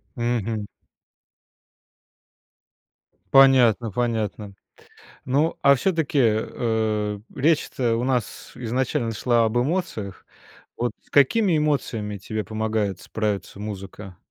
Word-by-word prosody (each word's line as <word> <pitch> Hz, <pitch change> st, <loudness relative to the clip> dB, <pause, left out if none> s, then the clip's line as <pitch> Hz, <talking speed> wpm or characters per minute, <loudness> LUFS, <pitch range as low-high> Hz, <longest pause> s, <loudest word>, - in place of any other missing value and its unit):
Мгм. 115 Hz, -3 st, -2 dB, 2.7 s
Понятно 125 Hz, -4 st, +6 dB
понятно. 110 Hz, -3 st, -2 dB, 0.7 s
Ну, 145 Hz, +5 st, +1 dB
а 140 Hz, 0 st, +6 dB
всё-таки, 160 Hz, -2 st, 0 dB
э, 110 Hz, -2 st, 0 dB
речь-то 135 Hz, -5 st, +1 dB
у 120 Hz, -, -2 dB
нас 125 Hz, -4 st, -2 dB
изначально 120 Hz, -1 st, -1 dB
шла 115 Hz, +1 st, +2 dB
об 110 Hz, +1 st, -1 dB
эмоциях. 125 Hz, -, -2 dB, 0.5 s
Вот 120 Hz, 0 st, -1 dB
с -, -, -30 dB
какими 170 Hz, -, +4 dB
эмоциями 115 Hz, -9 st, -1 dB
тебе 110 Hz, +3 st, -4 dB
помогает 110 Hz, -3 st, -2 dB
справиться 105 Hz, -3 st, -3 dB
музыка? 100 Hz, -2 st, -8 dB
115 Hz, 90 wpm, -23 LUFS, 105-130 Hz, 2.7 s, Понятно